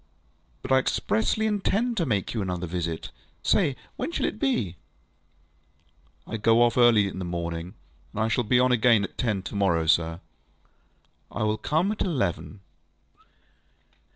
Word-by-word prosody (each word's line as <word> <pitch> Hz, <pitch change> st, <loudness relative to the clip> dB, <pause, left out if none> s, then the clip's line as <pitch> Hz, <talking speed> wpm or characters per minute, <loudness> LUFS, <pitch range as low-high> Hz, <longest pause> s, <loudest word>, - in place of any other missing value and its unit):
ŌĆØ -, -, -5 dB
ŌĆ£But -, -, +6 dB
I -, -, +6 dB
expressly 125 Hz, -, 0 dB
intend 215 Hz, +3 st, 0 dB
to 170 Hz, -, 0 dB
make 100 Hz, -6 st, -1 dB
you 110 Hz, -, -2 dB
another 90 Hz, -2 st, -3 dB
visit. 85 Hz, -1 st, -4 dB, 0.3 s
Say, -, -, +2 dB, 0.2 s
when -, -, -3 dB
shall -, -, -1 dB
it 105 Hz, -, -3 dB
be? 110 Hz, -10 st, 0 dB, 1.5 s
ŌĆØ 110 Hz, -, -4 dB
ŌĆ£I -, -, -17 dB
go 115 Hz, +2 st, +5 dB
off 120 Hz, -, +2 dB
early 120 Hz, -5 st, +5 dB
in 95 Hz, -, -6 dB
the -, -, -3 dB
morning, 85 Hz, +1 st, -4 dB, 0.4 s
and 105 Hz, -, -3 dB
I -, -, +1 dB
shall 120 Hz, +2 st, +1 dB
be 125 Hz, +3 st, +3 dB
on 125 Hz, 0 st, +3 dB
again 120 Hz, -3 st, +4 dB
at 100 Hz, -, -6 dB
ten 105 Hz, -6 st, -1 dB
to 85 Hz, -, -7 dB
morrow 95 Hz, -5 st, +2 dB
night, 80 Hz, 0 st, +4 dB
sir. 80 Hz, 0 st, 0 dB, 1.1 s
ŌĆØ -, -, -9 dB
ŌĆ£I 110 Hz, -, +1 dB
will 105 Hz, 0 st, 0 dB
come 165 Hz, -, +1 dB
at 215 Hz, -, -5 dB
eleven. 105 Hz, -, -2 dB
110 Hz, 175 wpm, -26 LUFS, 90-125 Hz, 1.5 s, ŌĆ£But